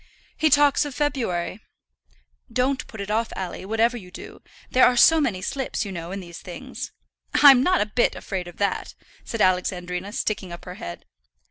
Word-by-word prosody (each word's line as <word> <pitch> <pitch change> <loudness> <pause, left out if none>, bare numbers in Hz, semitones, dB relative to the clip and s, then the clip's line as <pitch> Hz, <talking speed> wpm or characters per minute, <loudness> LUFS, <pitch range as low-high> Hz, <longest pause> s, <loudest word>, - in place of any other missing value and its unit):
"He 310 0 +2
talks 290 0 +5
of 290 -2 -6
February." 230 - -1 0.9
"Don't 255 +3 0
put 220 - -8
it 200 +1 -4
off, 225 +1 0
Alley, 185 0 -5
whatever 225 +4 +1
you 185 -5 -11
do. 180 - -11 0.3
There 255 - +4
are 250 - +1
so 320 +6 +7
many 200 -10 -1
slips, 265 -1 -2
you 200 - -5
know, 170 -1 -6
in 195 0 -4
these 170 -1 -10
things." - - -8 0.4
"I'm 275 -4 +8
not 365 +6 +3
a - - +2
bit 215 +3 +1
afraid 185 -3 -5
of 175 - -11
that," 200 -1 -2 0.3
said 230 - -4
Alexandrina, 180 0 0
sticking 205 -5 -2
up 170 - -9
her 180 - -7
head. 85 - -7
210 Hz, 185 wpm, -24 LUFS, 185-260 Hz, 0.9 s, I'm